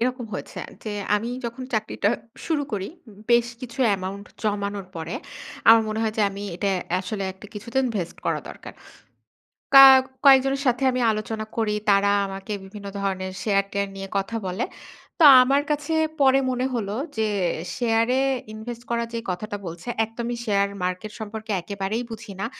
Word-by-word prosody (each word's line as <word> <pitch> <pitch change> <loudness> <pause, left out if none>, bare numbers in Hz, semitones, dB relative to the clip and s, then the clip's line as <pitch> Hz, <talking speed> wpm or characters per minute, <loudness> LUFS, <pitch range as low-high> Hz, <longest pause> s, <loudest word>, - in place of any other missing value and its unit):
এরকম 250 +1 -1
হয়েছে - - -7
আ - - -16 0.2
যে 215 - -3 0.2
আমি 220 +3 -1 0.2
যখন 235 +2 -5
চাকরিটা 215 -1 0 0.4
শুরু 310 -3 +1
করি, 195 -2 -2 0.4
বেশ 235 0 +5
কিছু 255 +1 -9 0.2
amaount 190 +2 -6 0.2
জমানোর 200 -2 -2
পরে, 165 +7 -5 0.5
আমার 225 0 +9
মনে 215 +1 -2
হয় 220 -1 -1
যে - - +4
আমি 200 +1 -7
এটা 200 +3 -1 0.3
আসলে 195 +2 -4
একটা 190 +2 -13
কিছুদিন 235 +5 -1
invest 195 -8 -3
করা - - 0
দরকার। - - -10 1.0
কা 270 0 +12 0.4
কয়েকজনের 270 0 +6
সাথে 245 +1 +2
আমি 255 - -1
আলোচনা 215 0 -3
করি। 220 -2 +1 0.2
তারা 200 0 +4 0.2
আমাকে 195 +1 -6
বিভিন্ন 200 +1 -10
ধরনের 190 -1 -2
শেয়ার-টেয়ার 200 -1 0
নিয়ে 195 0 -6
কথা 195 +3 -1
বলে। 185 +6 -2 0.5
তো 335 - +6 0.2
আমার 275 +3 +3
কাছে 295 +1 -1 0.3
পরে 270 0 +6
মনে 255 0 0
হলো 205 -4 -2 0.2
যে 220 - +1 0.5
শেয়ার 230 -1 +2
এ - - +2 0.3
ইনভেস্ট 230 +2 -7
করা 235 0 0
যে 230 - -2
কথাটা 205 +3 -4
বলছে 170 +7 -8 0.2
একদমই 235 +2 -4
শেয়ার 200 -2 +2 0.2
মার্কেট 185 +4 -3
সম্পর্কে 220 0 -5
একেবারেই 200 +5 -3
বুঝি 225 -1 -8
না। 195 - -1
215 Hz, 160 wpm, -24 LUFS, 200-235 Hz, 1.0 s, কা